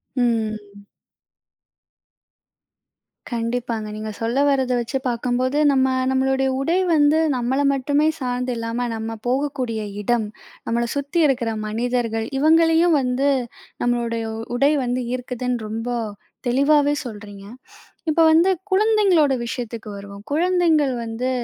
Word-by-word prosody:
ம். 215 Hz, -4 st, -2 dB, 2.5 s
கண்டிப்பாங்க, 230 Hz, -1 st, -2 dB
நீங்க 215 Hz, 0 st, -5 dB
சொல்ல 230 Hz, +3 st, -1 dB
வர்றத 265 Hz, -2 st, +1 dB
வச்சுப் 255 Hz, +3 st, -3 dB
பார்க்கும்போது 250 Hz, +3 st, -1 dB
நம்ம 265 Hz, -1 st, +3 dB, 0.2 s
நம்மளுடைய 265 Hz, 0 st, +1 dB
உடை 325 Hz, +6 st, +1 dB, 0.2 s
வந்து, 300 Hz, 0 st, +4 dB, 0.2 s
நம்மள 250 Hz, +3 st, 0 dB
மட்டுமே 285 Hz, +3 st, +1 dB
சார்ந்து 250 Hz, -1 st, -2 dB
இல்லாம 230 Hz, +2 st, -2 dB
நம்ம 225 Hz, 0 st, -5 dB
போகக்கூடிய 255 Hz, -4 st, -1 dB, 0.2 s
இடம், 230 Hz, 0 st, +1 dB, 0.4 s
நம்மள 235 Hz, +1 st, 0 dB
சுத்தி 285 Hz, +4 st, 0 dB
இருக்ற 250 Hz, -4 st, 0 dB, 0.2 s
மனிதர்கள், 230 Hz, 0 st, -1 dB
இவங்களையும் 325 Hz, +2 st, +4 dB
வந்து, 255 Hz, +2 st, +1 dB, 0.5 s
நம்மளுடைய 235 Hz, -1 st, -1 dB, 0.3 s
உடை 275 Hz, +4 st, +3 dB
வந்து 245 Hz, +1 st, -1 dB
ஈர்க்குதுன்னு 250 Hz, -2 st, -3 dB
ரொம்ப 225 Hz, +3 st, -4 dB, 0.6 s
தெளிவாவே 285 Hz, +3 st, +3 dB
சொல்றீங்க. 205 Hz, -3 st, -9 dB, 0.6 s
இப்ப 315 Hz, +1 st, +2 dB
வந்து 330 Hz, +4 st, +5 dB, 0.2 s
குழந்தைகளோட 385 Hz, -7 st, +3 dB
விஷயத்துக்கு 235 Hz, -2 st, -5 dB
வருவோம். 200 Hz, 0 st, -10 dB
குழந்தைகள் 325 Hz, -3 st, +2 dB
வந்து, 230 Hz, +3 st, -3 dB
250 Hz, 105 wpm, -22 LUFS, 230-285 Hz, 2.5 s, வந்து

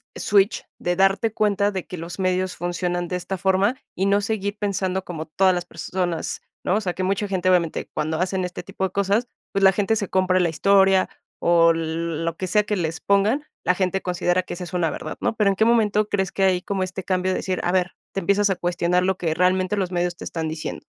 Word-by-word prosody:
switch 200 Hz, 0 st, +2 dB
de 175 Hz, 0 st, -1 dB
darte 195 Hz, +3 st, +2 dB
cuenta 205 Hz, -1 st, +2 dB
de 190 Hz, -2 st, -5 dB
que 180 Hz, -, -7 dB
los 170 Hz, +3 st, -7 dB
medios 185 Hz, 0 st, 0 dB
funcionan 175 Hz, 0 st, -2 dB
de 180 Hz, -, -3 dB
esta 180 Hz, +2 st, -4 dB
forma 195 Hz, +5 st, +2 dB, 0.2 s
y 190 Hz, -, 0 dB
no 200 Hz, +1 st, +4 dB
seguir 205 Hz, -1 st, -2 dB
pensando 190 Hz, -2 st, -1 dB
como 160 Hz, -3 st, -5 dB
todas 185 Hz, +4 st, +3 dB
las 175 Hz, 0 st, -3 dB
personas, 180 Hz, -2 st, -3 dB, 0.2 s
¿no? 185 Hz, -, +2 dB
O 215 Hz, -, +1 dB
sea, 180 Hz, -3 st, -2 dB
que 185 Hz, -, -3 dB
mucha 200 Hz, +2 st, 0 dB
gente, 185 Hz, -1 st, +1 dB
obviamente, 170 Hz, -3 st, +1 dB
cuando 155 Hz, +1 st, -2 dB
hacen 185 Hz, +1 st, 0 dB
este 180 Hz, -, -6 dB
tipo 190 Hz, 0 st, -6 dB
de 190 Hz, -, 0 dB
cosas, 200 Hz, +5 st, +1 dB, 0.3 s
pues 195 Hz, -, +1 dB
la 190 Hz, -, +8 dB
gente 205 Hz, +3 st, +1 dB
se 205 Hz, -4 st, -2 dB
compra 185 Hz, 0 st, +2 dB
la 175 Hz, -, +2 dB
historia 195 Hz, +2 st, +4 dB, 0.3 s
o 170 Hz, -1 st, +5 dB
lo 165 Hz, 0 st, -2 dB
que 185 Hz, -, -3 dB
sea 210 Hz, +4 st, +3 dB
que 210 Hz, 0 st, -1 dB
les 160 Hz, -2 st, -2 dB
pongan, 210 Hz, +9 st, +2 dB, 0.2 s
la 180 Hz, -, +3 dB
gente 185 Hz, 0 st, 0 dB
considera 180 Hz, 0 st, 0 dB
que -, -, -7 dB
esa 180 Hz, 0 st, -6 dB
es 170 Hz, -, -11 dB
una 170 Hz, -3 st, +1 dB
verdad, -, -, -6 dB
¿no? -, -, +1 dB
Pero, 205 Hz, -2 st, +3 dB
¿en 195 Hz, -, +1 dB
qué 220 Hz, -, +2 dB
momento 215 Hz, -2 st, +3 dB
crees 190 Hz, -2 st, 0 dB
que 195 Hz, -, 0 dB
hay 185 Hz, -1 st, +3 dB
como 195 Hz, -1 st, -2 dB
este 185 Hz, +1 st, -5 dB
cambio 185 Hz, 0 st, 0 dB
de -, -, 0 dB
decir: 185 Hz, -1 st, -2 dB
"A 175 Hz, -, +1 dB
ver", 185 Hz, -1 st, 0 dB, 0.2 s
te -, -, -1 dB
empiezas 200 Hz, +2 st, +2 dB
a 190 Hz, -, +1 dB
cuestionar 175 Hz, 0 st, +1 dB
lo 190 Hz, 0 st, +1 dB
que 160 Hz, -3 st, -1 dB
realmente 185 Hz, +3 st, +1 dB
los 185 Hz, -2 st, -1 dB
medios 175 Hz, 0 st, -1 dB
te -, -, -8 dB
están 160 Hz, -2 st, -3 dB
diciendo? 155 Hz, 0 st, -5 dB
185 Hz, 235 wpm, -23 LUFS, 175-195 Hz, 0.3 s, la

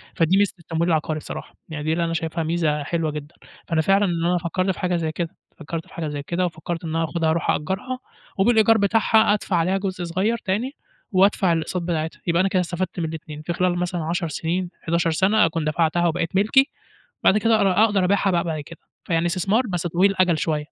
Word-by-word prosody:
فدي 170 Hz, +4 st, +3 dB
ميزة 205 Hz, -1 st, +2 dB
التمويل 170 Hz, +1 st, -1 dB
العقاري 155 Hz, -1 st, 0 dB
بصراحة. -, -, -8 dB, 0.2 s
يعني 150 Hz, -2 st, -5 dB
دي 155 Hz, +1 st, 0 dB
اللي 170 Hz, 0 st, 0 dB
أنا 165 Hz, -, -2 dB
شايفها 165 Hz, 0 st, -2 dB
ميزة 155 Hz, -3 st, 0 dB
حلوة 160 Hz, 0 st, -1 dB
جدًا، 150 Hz, +2 st, -8 dB, 0.3 s
فأنا 165 Hz, -2 st, +1 dB
فعلًا 195 Hz, +4 st, +3 dB
إن 170 Hz, -2 st, -1 dB
أنا 180 Hz, +1 st, +2 dB
فكرت 185 Hz, +3 st, -1 dB
في -, -, -7 dB
حاجة 180 Hz, -1 st, 0 dB
زي 160 Hz, -2 st, -1 dB
كده، 170 Hz, +2 st, -4 dB, 0.2 s
فكرت 165 Hz, 0 st, -6 dB
في -, -, -18 dB
حاجة 160 Hz, -2 st, -4 dB
زي 145 Hz, -1 st, -4 dB
كده، 175 Hz, +4 st, -1 dB
وفكرت 170 Hz, +1 st, -5 dB
إن 160 Hz, -, -4 dB
أنا 165 Hz, -, +1 dB
آخدها 160 Hz, +1 st, 0 dB
أروح 165 Hz, 0 st, 0 dB
أأجرها، 205 Hz, +11 st, -3 dB, 0.4 s
وبالإيجار 220 Hz, +2 st, +4 dB
بتاعها 220 Hz, +1 st, +3 dB
أدفع 200 Hz, -3 st, -1 dB
عليها 180 Hz, +3 st, +2 dB
جزء 185 Hz, -2 st, -3 dB
صغير 190 Hz, +7 st, 0 dB
تاني، 220 Hz, +6 st, -2 dB, 0.4 s
وأدفع 190 Hz, -2 st, +3 dB
الأقساط 165 Hz, +2 st, -2 dB
بتاعتها، 160 Hz, -2 st, -3 dB
يبقى 170 Hz, +1 st, +2 dB
أنا 195 Hz, -, +2 dB
كده 185 Hz, -, +1 dB
استفدت 180 Hz, +1 st, -3 dB
من 165 Hz, -, -1 dB
الإتنين، 155 Hz, -1 st, -7 dB
في 170 Hz, +2 st, -3 dB
خلال 180 Hz, 0 st, +1 dB
مثلًا 175 Hz, -2 st, -2 dB
10 170 Hz, +1 st, -1 dB
سنين، 170 Hz, +4 st, -2 dB
11 170 Hz, 0 st, +1 dB
سنة، 195 Hz, +4 st, +3 dB
أكون 165 Hz, -1 st, -2 dB
دفعتها 165 Hz, +2 st, +1 dB
وبقت 165 Hz, +1 st, -2 dB
ملكي، 265 Hz, +8 st, +4 dB, 0.5 s
وبعد 210 Hz, -, +5 dB
كده 225 Hz, 0 st, +3 dB
أر 195 Hz, -1 st, +4 dB
أقدر 200 Hz, -4 st, +1 dB
أبيعها 195 Hz, 0 st, +2 dB
بقى 170 Hz, -1 st, +1 dB
بعد 160 Hz, -3 st, -3 dB
كده، 165 Hz, +3 st, -12 dB, 0.3 s
فيعني 165 Hz, 0 st, +1 dB
إستثمار 195 Hz, +7 st, +1 dB
بس 175 Hz, -2 st, -2 dB
طويل 185 Hz, +4 st, +3 dB
الأجل 180 Hz, -4 st, +2 dB
شوية. 155 Hz, -1 st, 0 dB
175 Hz, 215 wpm, -23 LUFS, 165-190 Hz, 0.5 s, وبعد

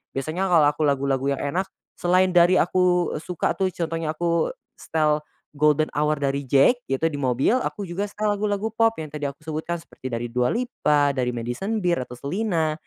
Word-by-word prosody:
biasanya 165 Hz, +8 st, -2 dB
kalau 160 Hz, -4 st, +6 dB
aku 150 Hz, -, -7 dB
lagu-lagu 135 Hz, -1 st, 0 dB
yang 140 Hz, -, -2 dB
enak 180 Hz, +7 st, -1 dB, 0.3 s
selain 185 Hz, +1 st, +2 dB
dari 175 Hz, +1 st, +5 dB
aku 180 Hz, 0 st, +2 dB
suka 175 Hz, 0 st, -1 dB
tuh 190 Hz, -1 st, 0 dB
contohnya 165 Hz, -2 st, -2 dB
aku 170 Hz, -1 st, +1 dB, 0.3 s
setel 155 Hz, -1 st, +1 dB, 0.3 s
"Golden 150 Hz, +1 st, +2 dB
Hour" 150 Hz, 0 st, +1 dB
dari 140 Hz, 0 st, -1 dB
JVKE 240 Hz, -, +3 dB
gitu 165 Hz, -, -1 dB
di 145 Hz, -, -4 dB
mobil 130 Hz, -, +2 dB
aku 200 Hz, -, -4 dB
juga 185 Hz, +4 st, -3 dB
setel 210 Hz, 0 st, -1 dB
lagu-lagu 205 Hz, +1 st, -2 dB
pop 225 Hz, 0 st, +2 dB
yang 155 Hz, -2 st, -6 dB
tadi 145 Hz, -1 st, -2 dB
aku 140 Hz, +2 st, -13 dB
sebutkan 160 Hz, +2 st, -3 dB
seperti 130 Hz, -5 st, -9 dB
dari 120 Hz, 0 st, -3 dB
Dua 125 Hz, 0 st, +2 dB
Lipa 150 Hz, -, +1 dB
dari 125 Hz, -2 st, -1 dB
Madison 120 Hz, -, -3 dB
Beer 170 Hz, -6 st, +1 dB
atau 125 Hz, -, -11 dB
Selena, 165 Hz, -, -1 dB
160 Hz, 180 wpm, -24 LUFS, 140-185 Hz, 0.3 s, kalau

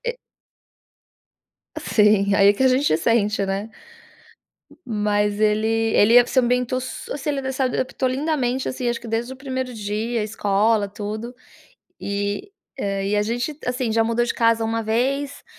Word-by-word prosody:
e 485 Hz, -, -2 dB, 1.6 s
Sim, 210 Hz, -2 st, +3 dB
e, 200 Hz, -, +3 dB
aí, 200 Hz, 0 st, +6 dB
que 265 Hz, -, -1 dB
a 260 Hz, -, +6 dB
gente 255 Hz, -, +2 dB
sente, 210 Hz, +2 st, +1 dB
né, 195 Hz, +3 st, -3 dB, 1.2 s
mas 210 Hz, -2 st, 0 dB
ele 215 Hz, +1 st, +2 dB, 0.3 s
ele 235 Hz, +4 st, +6 dB
se 260 Hz, -, -5 dB
ambientou 250 Hz, 0 st, +2 dB
su -, -, -6 dB
assim, 290 Hz, +1 st, -4 dB
ele 285 Hz, -, -1 dB, 0.2 s
adaptou 260 Hz, 0 st, -1 dB
lindamente, 265 Hz, -2 st, -1 dB
assim, 250 Hz, -1 st, -2 dB
acho 235 Hz, -, -2 dB
que 235 Hz, -, -10 dB
desde 230 Hz, +3 st, -2 dB
o 260 Hz, -, -9 dB
primeiro 260 Hz, -2 st, -4 dB
dia, 215 Hz, +2 st, -2 dB
escola 210 Hz, 0 st, +1 dB
tudo 215 Hz, +4 st, -6 dB, 0.7 s
e, 205 Hz, -, -3 dB, 0.3 s
ah, 195 Hz, -2 st, -2 dB
e 200 Hz, -, 0 dB
a 205 Hz, -, +2 dB
gente, 245 Hz, +7 st, -2 dB
assim, 250 Hz, -2 st, -1 dB
já 225 Hz, -, +3 dB
mudou 230 Hz, +1 st, +1 dB
de 240 Hz, -, -2 dB
casa 230 Hz, -1 st, +2 dB
uma 225 Hz, 0 st, -1 dB
vez, 275 Hz, +6 st, -1 dB
230 Hz, 155 wpm, -22 LUFS, 210-255 Hz, 1.6 s, aí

